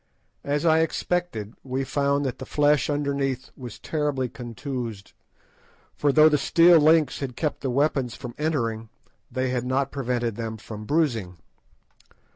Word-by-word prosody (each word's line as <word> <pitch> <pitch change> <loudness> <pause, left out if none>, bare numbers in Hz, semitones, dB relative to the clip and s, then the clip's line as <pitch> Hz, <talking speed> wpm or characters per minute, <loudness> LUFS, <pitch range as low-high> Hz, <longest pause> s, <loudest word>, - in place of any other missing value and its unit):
As 145 +3 -1
I 160 -1 +5
expected, 160 - -1
we 130 +1 -2
found 140 +1 0
that 130 - -3
the 130 - -6
flesh 145 -1 +2
underneath 140 -3 -1
was 125 -4 -9
terribly 145 -5 -2
contused, 120 -4 -6 0.8
for 145 - +1
though 155 +2 +7
the 150 -2 +3
steel 170 +3 +6
links 155 -2 +4
had 130 -3 -5
kept 150 -3 -2
the 135 - -2
weapons 135 -2 0
from 120 -1 -8
entering, 115 -8 -1 0.4
they 130 -1 -1
had 125 -2 -1
not 130 +2 0
prevented 120 -5 -2
them 110 -1 -4
from 105 0 -9
bruising. 115 - 0
135 Hz, 145 wpm, -25 LUFS, 120-150 Hz, 0.8 s, though